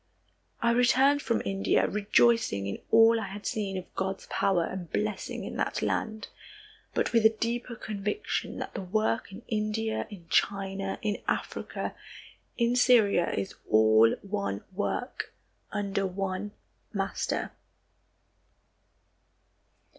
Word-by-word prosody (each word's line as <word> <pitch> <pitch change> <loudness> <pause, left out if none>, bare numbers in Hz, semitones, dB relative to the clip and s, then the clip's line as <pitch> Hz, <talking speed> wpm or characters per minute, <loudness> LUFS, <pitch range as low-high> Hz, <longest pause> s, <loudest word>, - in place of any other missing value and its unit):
I 235 - +4
returned 260 +4 +4
from 230 -2 0
India, 195 0 +2
rejoicing 210 - +3
in 100 - -4
all 225 0 +6
I - - -4
had 205 +2 -8
seen 200 -3 -2
of 185 - -8
God's 190 0 -3
power 190 -4 +2
and 180 -2 -6
blessing 210 -1 -2
in - - -6
that - - -1
land, 220 -1 -2 0.7
but - - 0
with 230 -1 +4
a 220 - +8
deeper 235 +1 -2
conviction 210 - -3
that - - -5
the - - -4
work 215 +3 0
in 200 +5 -10
India, 215 0 -1
in 185 -6 -11
China, 195 +1 0
in 210 -2 -1
Africa, - - -3 0.6
in 235 0 +2
Syria 220 -8 +5
is 100 -1 -3 0.2
all 110 +1 +6
one 200 - -3
work, 210 +6 -3 0.4
under 200 -2 -1
one 190 +2 -3 0.4
Master. 195 -2 -2
205 Hz, 125 wpm, -29 LUFS, 195-225 Hz, 0.7 s, a